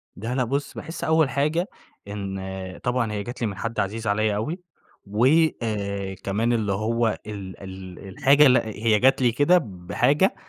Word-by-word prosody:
لا 115 +5 -4
لا 130 - +2
بُصّ، 140 +4 -2
باحس 165 - -7
أول 160 -3 +3
حاجة 155 +7 0 0.4
إن 100 -1 -5 0.5
طبعًا 125 -2 0
هي 105 -1 -3
جات 120 +3 -8
لي 115 - +1
من 100 -2 -5
حد 115 +2 -3
عزيز 110 +3 -2
عليَّ 105 +1 +1
أوي 150 - -3 0.5
و 105 +4 +1 0.4
آآ، 100 -3 -3
كمان 110 +5 0
اللي 105 -4 0
هو 115 +2 0
ال 100 -3 -7
ال 95 0 -9
الحاجة 140 +8 +5
لأ 125 -3 +4
هي 110 0 +1
جات 135 +2 +4
لي 120 -2 +4
كده 145 +9 +4
بحاجة 110 - +1
110 Hz, 170 wpm, -24 LUFS, 100-130 Hz, 0.5 s, الحاجة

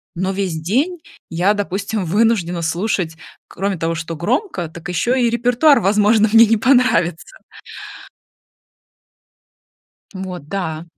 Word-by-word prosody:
но 190 +2 -2
весь 190 -5 -3
день 280 - -1 0.3
я, 180 +5 +1
допустим, 200 0 -3
вынуждена 185 -3 +1
слушать, 170 -1 -2 0.3
кроме 195 -1 -3
того, 165 +1 -2
что 165 0 -5
громко, 205 - -2
так 170 +1 -10
еще 240 +9 0
и 235 - +3
репертуар, 245 +5 +3
возможно, 210 +2 +3
мне 230 +1 +7
не 225 +1 +2
понравится. 250 - +1 2.8
Вот, 180 -5 -7
да. 165 -4 -4
195 Hz, 115 wpm, -18 LUFS, 170-230 Hz, 2.8 s, мне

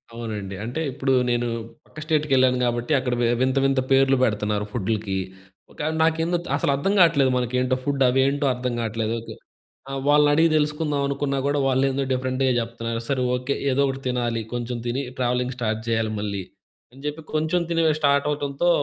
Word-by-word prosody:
అవునండి. 105 -4 -5
అంటే 125 +8 -3
ఇప్పుడు 135 0 0 0.2
నేను 120 0 +1 0.4
పక్క 155 - -12
స్టేట్‌కెళ్ళాను 135 -5 +3
గాబట్టి 120 +4 0
అక్కడ 125 -1 -2
వి - - +3 0.2
వింత 130 +1 +1
వింత 135 -1 +2
పేర్లు 135 0 +4
పెడుతున్నారు 105 -2 0
ఫుడ్లకి. 105 -3 -2 0.6
కాదు 155 +1 -1
నాకేందో 165 +2 +1
త్ - - -8
అసలు 140 - +1
అర్థం 195 +9 0
గాట్లేదు 145 -7 +5
మనకేంటో 125 +1 0
ఫుడ్ 140 -1 +1
అవేంటో 140 +3 +2
అర్థం 125 0 -3
గాట్లేదు. 115 0 -2
కు - - -6 0.6
ఆహ్, 135 0 -3
వాళ్ళనడిగి 150 +2 +5
తెలుసుకుందావనుకున్నా 145 -2 0
గూడా, 145 0 +1
వాళ్ళేందో 135 +1 +1
డిఫరెంట్‌గా 130 +1 0
జెప్తన్నారు. 115 0 -3
సరే 130 -2 0
ఓకే. 125 +2 -1 0.2
ఏదోకటి 135 0 +1
తినాలి, 120 -2 -1
కొంచెం 120 0 -3
తిని 130 +4 -1 0.2
ట్రావెలింగ్ 125 0 0
స్టార్ట్ 110 -2 -2
జెయ్యాలి 115 -1 0
మళ్ళీ, 100 -2 -3 0.5
అని 135 - -15
చెప్పి 150 +2 -4
కొంచెం 160 +3 +1
తినివే 165 -2 +3
స్టార్ట్ 140 -1 +3
అవ్వటంతో, 145 +3 -1
130 Hz, 155 wpm, -23 LUFS, 120-145 Hz, 0.6 s, గాట్లేదు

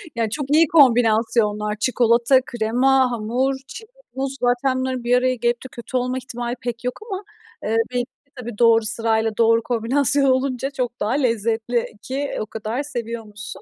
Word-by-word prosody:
Ya, 230 -2 0
çok 285 +6 -3
iyi 315 +2 +5
kombinasyonlar. 225 -6 +3
Çikolata, 240 +2 +3
krema, 250 +3 +2
hamur, 240 +4 -1
çilek, 445 -1 -10 0.3
muz. 270 0 -3
Zaten 250 +2 +1
bunların 260 -1 -2
bir 245 +1 +3
araya 255 0 +1
gelip 240 0 -1
de - - -7
kötü 240 +2 -4
olma 250 +1 -1
ihtimali 245 -1 -4
pek 240 0 -5
yok 250 0 -3
ama, 390 -2 -5 0.4
eee, 220 - -1 0.2
belki 245 -1 -1
de 280 +2 -45
tabii, 240 -4 -7
doğru 230 -1 +4
sırayla 225 0 0
doğru 230 0 +4
kombinasyon 265 +5 +1
olunca 260 0 0
çok 250 -4 -4
daha 210 - -1
lezzetli 230 -2 0 0.2
ki 275 +3 -3
o - - -2
kadar 220 +5 -4
seviyormuşsun. 225 -5 -7
240 Hz, 165 wpm, -21 LUFS, 225-260 Hz, 0.4 s, iyi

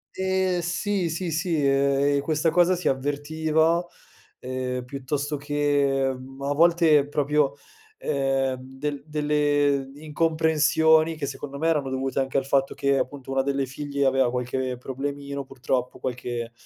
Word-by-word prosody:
Ehm, 190 -1 0
sì, 175 +2 -1
sì, 170 +2 -3
sì, 160 -1 0
ehm, 140 +1 +3
e - - 0
questa 155 +2 +1
cosa 175 +2 +4
si 175 -3 -3
avvertiva, 155 +5 +1 0.5
ehm, 125 0 -3
piuttosto 140 +3 -3
che, 145 -2 +1
mhmm, 135 +1 -12
a 140 +1 0
volte 160 -2 +4
proprio, 145 -1 +1 0.4
ehm, 135 - 0
del 135 +2 -5
delle 145 -2 +1
incomprensioni 160 +1 +2
che 150 -2 -4
secondo 140 +1 -6
me 160 +3 0
erano 150 -5 +1
dovute 130 +1 -2
anche 135 0 0
dal 135 -1 -1
fatto 135 0 +1
che 140 0 +1
appunto 135 0 -4
una 135 0 +2
delle 140 0 0
figlie 140 +1 -2
aveva 135 -1 +3
qualche 125 +1 -2
problemino 140 +2 -5
purtroppo, 125 -1 -3
qualche, 120 -2 -4
140 Hz, 140 wpm, -25 LUFS, 135-155 Hz, 0.5 s, cosa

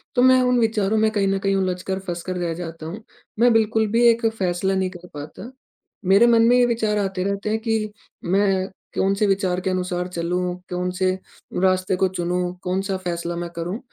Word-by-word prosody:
तो 245 - +4
मैं 255 0 +6
उन 250 -1 +3
विचारों 220 -2 +1
में 220 0 +3
कहीं 205 -2 +1
न 195 0 +1
कहीं 195 0 +1
उलझकर, 190 0 -1
फँसकर 185 -1 -5
रह 170 -2 -1
जाता 165 -1 -7
हूँ, 190 +8 -7 0.4
मैं 245 +1 +5
बिल्कुल 220 0 +2
भी 230 +2 +3
एक 230 0 +2
फैसला 190 -4 0
नहीं 190 -1 0
कर 180 -1 -12
पाता। 155 - -8 0.5
मेरे 200 +5 +6
मन 230 -1 +5
में 245 - +5
ये 245 - +5
विचार 225 -3 0
आते 195 -2 -1
रहते 200 +2 -2
हैं 220 +1 0
कि 220 -2 -1 0.3
मैं 190 +1 +2 0.3
कौन 195 +1 +2
से 210 - +1
विचार 190 -2 +1
के 190 - -1
अनुसार 180 -1 -2
चलूँ? 180 +1 -2
कौन 180 0 -2
से 185 0 +1 0.5
रास्ते 185 0 +2
को 190 +1 +2
चुनूँ, 180 0 -2
कौन-सा 190 +2 -1
फैसला 170 -2 -3
मैं 175 0 -4
करूँ? 175 +6 -3
190 Hz, 200 wpm, -22 LUFS, 180-215 Hz, 0.5 s, मैं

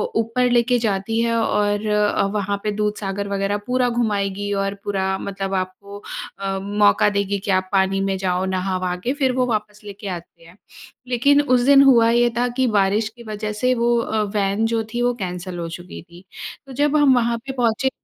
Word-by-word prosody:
ऊपर 245 +2 +1
लेके 245 +1 +3
जाती 220 0 -1
है। 230 0 +1
और 210 -1 0
अ, 210 -1 +2
वहाँ 205 -1 -1
पे 210 - 0
दूधसागर 205 -1 -2
वग़ैरह 200 +1 -1
पूरा 250 0 +1
घुमाएगी 205 -4 -1
और 195 0 -2
पूरा 190 -1 -1
मतलब 195 0 -4
आपको 190 +2 -4 0.4
अ, 195 -1 -2
मौका 205 +1 +3
देगी 200 0 -1
कि 195 0 -3
आप 185 0 +1
पानी 195 0 +2
में 195 -1 -1
जाओ 185 0 -1
नहा-वहा 185 -1 -1
के 255 - 0
फिर 270 -3 +1
वो 250 - +3
वापस 210 -3 -3
लेके 205 0 -9
आती 170 -2 -8
है। 170 - -16 0.5
लेकिन 280 +4 +3
उस 255 -4 +2
दिन 280 0 +7
हुआ 235 -4 +5
ये 240 0 +3
था 245 - +2
कि 260 - +3
बारिश 210 0 +2
की 235 +1 -15
वज़ह 215 -1 -4
से 250 +4 +1
वो 235 0 +2
अ, 220 -2 -1
वैन 200 +2 +1
जो 225 0 0
थी 240 - -1
वो 245 0 +2
कैंसल 180 0 -5
हो 165 - -4
चुकी 175 +2 -9
थी। 175 +2 -16 0.4
तो 265 - -9
जब 290 +2 +1
हम 285 -3 +5
वहाँ 235 -1 +1
पे 270 - -4
पहुँचे 245 +1 +1
210 Hz, 195 wpm, -21 LUFS, 195-235 Hz, 0.5 s, दिन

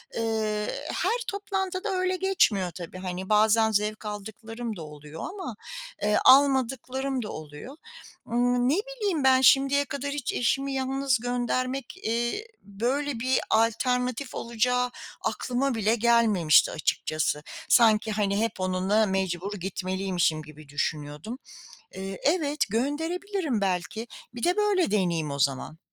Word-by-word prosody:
Eee, 220 -2 -1 0.3
her 420 +7 +1
toplantı 385 -2 -3
da - - -2
öyle 370 -1 0
geçmiyor 335 - +2
tabii. 170 +1 -8
Hani, 185 0 -5
bazen 220 +1 +4
zevk 215 +1 -1
aldıklarım 220 +2 -6
da 170 - -8
oluyor 150 +1 -10
ama, 370 - -6 0.5
eee, 210 0 +2
almadıklarım 265 -1 +3
da 210 - -6
oluyor. 155 - -9 0.5
Imm, 245 +1 +2
ne 290 - +3
bileyim, 410 - -2
ben 260 -1 +5
şimdiye 275 +2 +5
kadar 280 0 -4
hiç 285 -4 -3
eşimi 270 +3 0
yalnız 265 -1 0
göndermek, 245 +3 -2
eee, 235 - -1
böyle, 245 +6 -2
bir 255 +2 +2
alternatif 250 +3 +1
olacağı 250 +2 0 0.3
aklıma 255 +1 -1
bile 220 +1 +2
gelmemişti 225 -8 +4
açıkçası. 155 -1 -1 0.3
Sanki, 220 -2 +5
hani, 200 -1 0
hep 225 -2 -1
onunla 185 +4 +2
mecbur 190 0 -2
gitmeliymişim 185 -3 -1
gibi 155 -1 -14
düşünüyordum. 150 - -3 0.6
Eee, 195 0 -6
evet, 300 -2 +1
gönderebilirim 320 - -1
belki. 190 +3 -2 0.3
Bir 240 - -7
de 355 +1 +2
böyle 415 -4 +2
deneyeyim 170 -7 0
o 140 - -4
zaman. 140 +3 0
230 Hz, 125 wpm, -27 LUFS, 195-270 Hz, 0.6 s, ben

